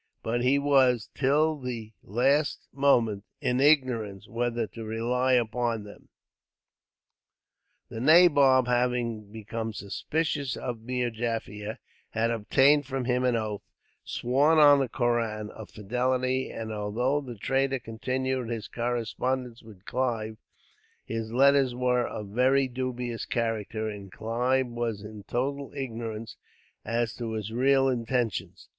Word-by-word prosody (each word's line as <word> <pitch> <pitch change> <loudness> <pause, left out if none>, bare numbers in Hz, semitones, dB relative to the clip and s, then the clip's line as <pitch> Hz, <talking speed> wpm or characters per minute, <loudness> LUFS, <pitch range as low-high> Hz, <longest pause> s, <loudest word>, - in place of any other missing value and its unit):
But 120 +2 -1
he 130 +3 +4
was, 135 -5 +3
till 150 +3 +2
the 115 -4 -6
last 135 +8 +1
moment, 120 -7 +2 0.2
in 125 +1 0
ignorance 125 -9 +2
whether 120 0 -1
to 115 +1 -9
rely 120 +4 0
upon 120 -2 +1
them. 105 0 -14 1.8
The 110 - -6
nabob, 140 -3 +6
having 120 -4 0
become 110 +1 -5
suspicious 140 +7 -2
of 120 -3 -5
Meer 125 0 -2
Jaffier, 110 -2 -4 0.3
had 115 +1 0
obtained 135 +6 +3
from 135 -2 -3
him 125 0 +1
an 125 -1 +2
oath, 110 -2 -2 0.4
sworn 140 +6 +2
on 145 -2 +7
the 135 -3 0
Koran, 115 -3 -1
of 110 - -10
fidelity; 130 +4 -1
and 110 -1 -6
although 120 +7 0
the 125 -4 -8
traitor 135 +5 0
continued 130 +2 -3
his 115 -2 -4
correspondence 120 +1 -2
with 105 -4 -15
Clive, 115 -4 -2 0.7
his 115 0 -4
letters 135 0 +4
were 125 -1 +1
of 105 -2 -7
a - - -13
very 130 +3 +3
dubious 125 -2 -4
character, 110 -2 -2
and 100 -3 -7
Clive 125 +8 0
was 120 -3 -3
in 105 -1 -10
total 140 +3 -2
ignorance 115 -4 -5 0.5
as 115 +1 -1
to 115 -2 -4
his 110 -1 -4
real 135 +3 +3
intentions. 120 -3 -2
120 Hz, 130 wpm, -27 LUFS, 110-130 Hz, 1.8 s, on